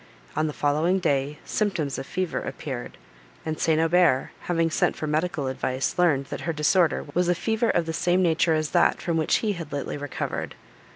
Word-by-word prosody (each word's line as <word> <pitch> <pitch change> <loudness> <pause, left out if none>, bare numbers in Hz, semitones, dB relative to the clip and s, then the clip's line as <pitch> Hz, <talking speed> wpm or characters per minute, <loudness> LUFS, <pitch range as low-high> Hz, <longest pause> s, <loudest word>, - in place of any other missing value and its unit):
On 155 0 +1
the - - -2
following 155 +6 +1
day, 145 -4 0
symptoms 165 - -1
of - - -7
fever 185 -2 -2
appeared, 130 -5 -6 0.5
and 155 -1 -3
St. 160 -1 +2
Aubert, 165 -4 +3 0.2
having 165 -2 +2
sent - - +1
for - - -4
medical 155 0 -1
advice, 130 +3 -2
learned, 145 -6 +3
that - - -4
her 165 - -2
disorder 160 +2 +2
was 180 0 +1
a 175 - +3
fever 225 +5 0
of 170 - +2
the 160 - -3
same 175 +2 +2
nature 165 -1 +3
as 155 -1 -1
that, - - +3
from 170 - -2
which 160 -1 +2
he 210 - +1
had 165 -5 -7
lately 145 0 -3
recovered. 145 -1 -4
160 Hz, 190 wpm, -25 LUFS, 145-175 Hz, 0.5 s, Aubert